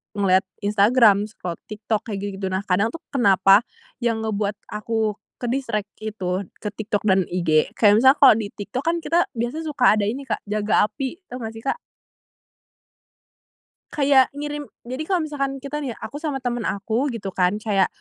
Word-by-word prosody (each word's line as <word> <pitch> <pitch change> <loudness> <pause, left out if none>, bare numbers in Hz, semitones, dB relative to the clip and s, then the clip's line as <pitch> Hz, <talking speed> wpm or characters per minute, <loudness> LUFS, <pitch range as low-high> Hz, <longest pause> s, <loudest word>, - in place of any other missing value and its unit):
ngeliat 190 -1 +2 0.2
Instagram, 210 0 +4
scroll 180 -5 -7
TikTok, 215 +1 -3
kayak 210 -3 -3
gitu-gitu. 195 -1 -4
Nah, 190 +1 -2
kadang 200 +2 +2
tuh, 330 - -8
kenapa, 195 -5 +5 0.4
yang 230 -2 0
ngebuat 210 -1 -1 0.2
aku 215 0 -1 0.2
ke-distract, 240 -4 -2 0.2
itu, 190 -3 -2 0.2
ke - - -5
TikTok 205 -1 -2
dan 190 -1 +4
IG, 165 -4 +2
kayak 205 -2 +6
misalnya, 265 +3 +6
kalau - - +8
di 220 -2 -2
TikTok, 205 +6 -5
kan, 335 +1 +1
kita 330 +3 +2
biasanya 240 +8 -3
suka 250 -6 +4
ada 210 - 0
ini, 255 +7 -3
Kak, - - -2
"jaga 210 0 +2
api," 270 +3 -4 0.2
tau 250 - -5
nggak 225 -2 -5
sih, 225 - -10
Kak? 275 - -1 2.1
Kayak 275 -3 +4
ngirim 295 0 -5 0.2
jadi 255 +4 -6
kalau 365 -4 +1
misalkan 275 -3 -3
kita 295 +2 -4
nih, 265 -6 -4
aku 290 - -7
sama 290 -4 -3
teman 240 -3 -2
aku 220 +7 -1
gitu 230 -7 -4
kan, 180 +1 +1
kayak, 210 -2 +1
220 Hz, 170 wpm, -23 LUFS, 200-265 Hz, 2.1 s, kalau